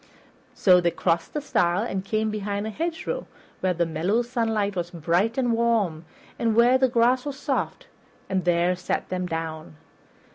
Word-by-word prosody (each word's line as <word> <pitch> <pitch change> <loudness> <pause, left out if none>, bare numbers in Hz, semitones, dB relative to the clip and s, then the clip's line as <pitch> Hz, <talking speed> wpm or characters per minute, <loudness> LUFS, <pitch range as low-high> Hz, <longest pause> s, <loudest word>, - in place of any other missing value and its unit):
So 180 -2 +5
they 170 - +2
crossed 170 - -1
a 300 - -1
stile 180 -7 +1
and 195 -5 -3
came 215 +2 -1
behind 205 -1 -3
a 220 - -3
hedgerow 325 +6 -3 0.3
where 185 -1 0
the 170 +1 +1
mellow 175 +9 0
sunlight 225 -4 -1
was 175 -1 -2
bright 175 - 0
and 250 -3 +1
warm, 220 -9 +1 0.3
and 225 -2 +1
where 245 +3 +5
the 260 -1 +3
grass 245 +1 +3
was 285 -2 -5
soft, 280 -1 -2 0.4
and 190 -1 -1
there 175 +1 +2
sat 180 0 -3
them 180 -1 -2
down. 160 -2 -5
200 Hz, 170 wpm, -25 LUFS, 175-235 Hz, 0.4 s, So